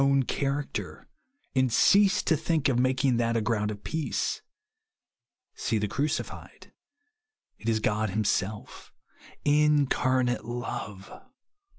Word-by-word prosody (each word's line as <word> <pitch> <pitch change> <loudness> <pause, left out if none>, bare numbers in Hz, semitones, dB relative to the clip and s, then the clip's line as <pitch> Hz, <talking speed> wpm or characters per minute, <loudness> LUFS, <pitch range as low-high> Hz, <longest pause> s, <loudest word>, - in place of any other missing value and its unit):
own 140 0 +3
character, 140 +2 -3 0.5
and 130 -2 +2
cease 200 - +4
to 160 - +2
think 155 0 0
of 125 -3 +1
mak 130 +1 +1
ing 125 -3 +3
that 115 0 +1
a - - +2
gronnd 105 -1 0
of 105 -1 -7
peace. 160 -1 -2 1.1
See 115 - -1
the 105 0 -1
Crucified. 145 +8 -4 0.9
It 115 - -3
is 110 -1 +2
God 105 0 0
himself; 105 0 -2 0.5
incarnate 140 -4 +2
love. 120 -5 -6
125 Hz, 115 wpm, -27 LUFS, 110-140 Hz, 1.1 s, cease